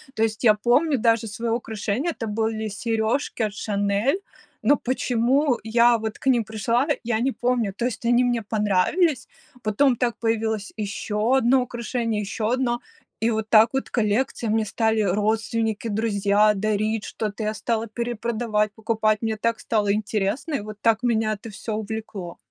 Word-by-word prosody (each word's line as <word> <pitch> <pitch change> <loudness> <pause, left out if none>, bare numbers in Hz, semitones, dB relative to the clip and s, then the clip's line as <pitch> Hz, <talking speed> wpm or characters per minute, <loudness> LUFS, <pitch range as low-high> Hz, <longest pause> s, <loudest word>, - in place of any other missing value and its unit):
То 220 - +1
есть 220 +1 -1
я 215 -3 +6
помню 260 +7 +2
даже 230 0 +2
свое 230 +3 -3
украшение. 225 +6 -2
Это 225 -8 -5
были 220 0 -1
сережки 225 +4 -1
от 210 -2 -1
"Шанель", 205 - 0 0.4
но 290 - +4
почему 255 +2 +1
я 235 +1 +4
вот 220 -1 -5
к - - -6
ним 245 -3 +4
пришла, 220 +5 0 0.2
я 225 -1 0
не 265 +2 +1
помню. 240 -6 0
То 235 +4 -3
есть 245 -1 -3
они 240 +1 +4
мне 240 -2 +1
понравились. 220 - +1 0.3
Потом 245 +5 +3
так 240 -1 -1
появилось 220 -2 -1
еще 215 +3 0
одно 260 +1 +4
украшение, 235 -2 -2
еще 215 +2 -2
одно, 245 -1 0 0.4
и 225 - +2
вот 220 -1 -2
так 220 +1 +7
вот 270 - -2
коллекция, 225 +1 0
мне 220 0 +1
стали 220 +1 +1
родственники, 220 +3 0
друзья 210 -1 +2
дарить 215 +1 -1
что-то, 215 0 -4
я 215 0 -1
стала 230 0 -2
перепродавать, 225 -2 -1
покупать, 215 -1 0
мне 220 -1 -1
так 230 +1 0
стало 205 -3 +1
интересно, 215 +8 -1
и - - 0
вот 210 0 -8
так 225 -1 +3
меня 225 -3 +1
это 215 +2 -8
всё 215 +1 -5
увлекло. 215 -4 -6
225 Hz, 165 wpm, -24 LUFS, 215-240 Hz, 0.4 s, так